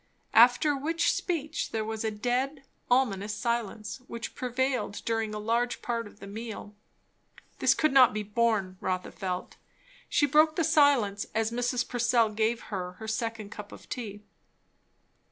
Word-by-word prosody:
After 245 +6 +6
which 325 +4 +1
speech 310 -4 -2
there 220 -1 -2
was 220 0 -4
a 220 - +1
dead, 250 +6 -1 0.3
ominous 210 -5 +2
silence, 220 -1 -2
which 235 0 -6
prevailed 250 -4 -1
during 225 -1 0
a 215 - -4
large 235 +3 -1
part 230 -2 -2
of 205 - -17
the - - -9
meal. 215 0 -7 0.9
This - - +4
could 310 -3 +2
not 260 -3 +7
be 215 0 -3
borne, 210 -3 0
Rotha 185 -1 -2
felt. 185 -1 -5 0.5
She 290 - +3
broke 305 +2 +4
the 330 - +1
silence 270 -11 +3
as 225 0 +1
Mrs. 245 +1 0
Purcell 240 -2 +2
gave 225 +2 0
her 180 -2 -3
her 220 +4 -9
second 220 -1 -3
cup 210 -1 -8
of - - -12
tea. 210 -4 -6
230 Hz, 155 wpm, -28 LUFS, 210-255 Hz, 0.9 s, not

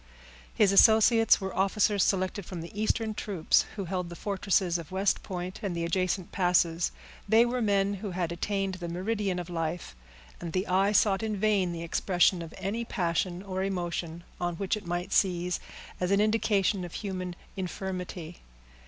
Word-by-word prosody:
His 205 -3 +4
associates 225 +2 +6
were 190 -2 -5
officers 200 +1 +2
selected 190 +1 0
from 175 -1 -7
the 170 - -8
eastern 220 +1 0
troops, 195 -6 +1
who 200 -3 -4
held 180 0 -3
the 170 - -8
fortresses 190 -2 0
of 165 -1 -10
West 190 +1 +1
Point 180 0 -5
and 195 -4 -3
the 170 0 -1
adjacent 185 +1 -1
passes; 175 -2 +2 0.4
they 225 +2 +6
were 245 +1 -1
men 200 -2 +2
who 200 +1 -5
had 175 -2 -2
attained 195 +2 -2
the 170 - -4
meridian 190 +2 -1
of 175 -1 -4
life, 165 - -4 0.4
and 165 -2 -6
the 185 +1 0
eye 195 +2 +2
sought 200 -2 +3
in 215 -2 -2
vain 195 -3 +2
the 170 -1 -5
expression 175 +1 +2
of 165 -1 -8
any 200 +5 -2
passion 175 -2 -1
or 190 -1 -3
emotion 175 -3 -3 0.2
on 175 -1 -1
which 195 +3 -1
it 210 -4 -8
might 175 +2 -3
seize 180 -2 +1 0.4
as 180 - 0
an 200 0 +3
indication 210 -3 +2
of 175 - -7
human 185 -3 -4 0.2
infirmity. 180 -2 -5
185 Hz, 170 wpm, -28 LUFS, 175-200 Hz, 0.4 s, associates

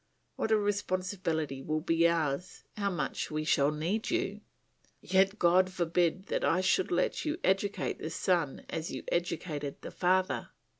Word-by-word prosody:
What - - -1
a 220 - +5
responsibility 185 -8 -1
will 155 +3 -1
be 165 0 +3
ours, 165 -1 -1
how 200 -1 0
much 180 - -2
we 155 0 -2
shall 145 -2 +3
need 170 +9 -2
you! 355 +3 -1 0.6
Yet 195 +2 +2
God 185 0 +4
forbid 175 0 +1
that - - -2
I 175 - +3
should 185 0 +2
let 180 +1 0
you 310 +1 -1
educate 195 +2 0
the 155 - -4
son 165 -4 0
as 160 0 -4
you - - -5
educated 155 -4 -2
the - - -6
father. 185 +1 +1
180 Hz, 155 wpm, -31 LUFS, 160-190 Hz, 0.6 s, a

